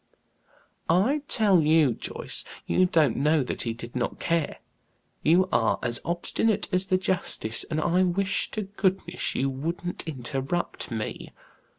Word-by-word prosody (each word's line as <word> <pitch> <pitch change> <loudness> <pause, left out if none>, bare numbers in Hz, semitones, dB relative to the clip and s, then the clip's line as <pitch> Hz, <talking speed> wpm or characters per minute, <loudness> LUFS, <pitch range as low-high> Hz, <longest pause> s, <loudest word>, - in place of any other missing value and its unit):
"I 215 - +3
tell 200 -7 +4
you, 155 -4 +4
Joyce, - - -3 0.2
you 185 - +3
don't 155 -8 +2
know 150 +1 +3
that - - -3
he 115 - -2
did 115 +2 -9
not 120 -1 -2
care. 165 -3 -1 0.6
You 180 +4 +4
are 115 -2 +2
as 120 0 +2
obstinate 195 +5 0
as 185 +1 +2
the 185 - +3
justice, 180 - -1
and 155 -1 -2
I 175 +3 +2
wish 185 +2 +1
to 215 - -3
goodness 190 -3 -1
you 135 - +1
wouldn't 165 +6 -4
interrupt 135 +3 -3
me. 110 -2 -5
170 Hz, 145 wpm, -26 LUFS, 135-185 Hz, 0.6 s, tell